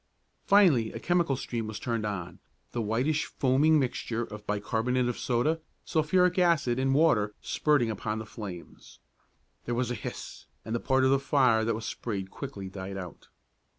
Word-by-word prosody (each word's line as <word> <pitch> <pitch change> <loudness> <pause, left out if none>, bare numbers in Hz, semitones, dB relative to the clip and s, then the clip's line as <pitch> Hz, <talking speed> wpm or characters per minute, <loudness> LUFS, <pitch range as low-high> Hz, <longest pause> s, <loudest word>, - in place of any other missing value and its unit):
Finally 170 - +5
a - - -5
chemical 170 -5 +1
stream 115 -3 -4
was 110 -1 -5
turned 115 -1 -2
on, 90 -4 -5 0.3
the 120 - -2
whitish 125 +8 0
foaming 145 +4 +3
mixture 120 -3 -1
of 105 -2 -9
bicarbonate 115 +4 0
of 125 - -1
soda, 150 +7 0 0.2
sulphuric 180 +3 +2
acid 160 -9 +3
and 135 0 +2
water 105 -10 +3
spurting 145 -7 +1
upon 110 +1 -3
the 110 - -5
flames. 100 -6 -9 0.7
There 120 - -1
was 125 0 -1
a - - 0
hiss, 115 - -7 0.2
and 110 - -4
the 120 - 0
part 130 +2 +2
of 130 - +4
the 135 - +4
fire 130 -5 +3
that 115 0 0
was 110 0 -6
sprayed 100 -4 -4
quickly 115 -9 -7
died 95 0 -6
out. 90 -4 -9
120 Hz, 170 wpm, -28 LUFS, 110-140 Hz, 0.7 s, Finally